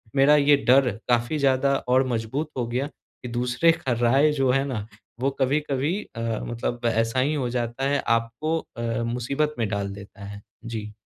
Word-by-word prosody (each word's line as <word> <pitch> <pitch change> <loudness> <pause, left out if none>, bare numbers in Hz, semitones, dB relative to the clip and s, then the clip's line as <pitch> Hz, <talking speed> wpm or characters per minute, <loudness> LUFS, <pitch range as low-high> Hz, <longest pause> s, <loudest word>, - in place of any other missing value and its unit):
मेरा 140 +2 +6
ये 145 0 +5
डर 130 +1 +6 0.2
काफ़ी 120 +5 +2
ज़्यादा 140 0 +3
और 130 +1 +4
मज़बूत 125 +6 -2
हो 125 - 0
गया 125 +4 -1
कि 135 - -14
दूसरे 125 +7 +2
का 165 -5 -3
राय 135 +6 +4
जो 135 -3 +1
है 135 +1 +2
ना, 120 -7 -4 0.3
वो 135 +2 +1
कभी-कभी 140 +3 0 0.2
अ, - - -6 0.3
मतलब 120 0 -4
ऐसा 115 +3 +1
ही 140 +4 +2
हो 135 -5 -1
जाता 120 +2 -2
है 145 0 +1 0.2
आपको 120 +8 -2 0.2
अ, - - -4 0.2
मुसीबत 135 +6 -1
में 115 - +1
डाल 100 -1 -2
देता 100 0 -12
है। 100 0 -8 0.2
जी। 110 -2 -5
130 Hz, 180 wpm, -25 LUFS, 115-140 Hz, 0.3 s, मेरा